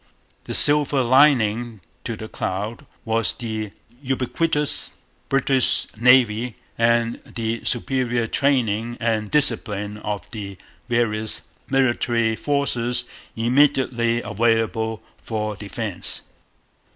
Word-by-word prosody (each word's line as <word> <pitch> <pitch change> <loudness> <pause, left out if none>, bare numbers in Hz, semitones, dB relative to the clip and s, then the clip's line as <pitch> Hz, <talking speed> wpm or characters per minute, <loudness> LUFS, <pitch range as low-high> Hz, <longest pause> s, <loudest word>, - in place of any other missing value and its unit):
The - - -4
silver 145 -2 +5
lining 120 -4 +3 0.3
to 115 - -3
the 110 - -7
cloud 105 +3 -4 0.2
was 115 0 +1
the 110 -2 -4 0.3
ubiquitous 145 +3 0 0.4
British 135 -1 +2
Navy 120 -1 +3 0.2
and 115 0 +1
the 115 -1 -4
superior 120 -1 0
training 120 -3 0
and 110 -2 -1
discipline 105 -8 +1
of 105 -1 -4
the 100 -3 -7 0.3
various 110 -2 0 0.3
little 135 -1 +3
military 115 -2 0
forces 125 -3 0 0.3
immediately 120 -1 +2
available 110 0 0 0.2
for 110 -2 -3
defence. 105 -1 -4
115 Hz, 95 wpm, -22 LUFS, 110-130 Hz, 0.4 s, silver